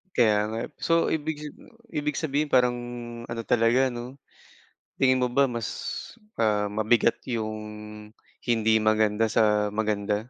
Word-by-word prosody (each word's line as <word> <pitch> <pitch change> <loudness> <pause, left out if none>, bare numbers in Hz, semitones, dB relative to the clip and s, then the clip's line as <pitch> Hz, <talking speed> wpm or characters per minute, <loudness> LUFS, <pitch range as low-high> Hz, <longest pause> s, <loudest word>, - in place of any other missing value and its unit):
Kaya 105 -3 +3
nga, 110 +1 -4
eh. - - -6
So, 165 0 +2
ibig 155 -1 -2
sab 150 - -8 0.4
ibig 150 0 -2
sabihin 150 -1 0
parang 125 -2 +3 0.5
ano 115 0 -4
talaga, 125 +3 +3
'no. 120 +2 -7 0.8
Tingin 130 -1 +3
mo 125 - +1
ba 140 +2 +4
mas, 115 -3 -3 0.7
ah, 105 -2 +1
mabigat 110 +3 +2 0.2
'yong 110 -2 -2 0.9
hindi 115 -2 +2
maganda 110 0 +2
sa 105 -1 +3
maganda? 105 -1 0
115 Hz, 135 wpm, -26 LUFS, 110-130 Hz, 0.9 s, ba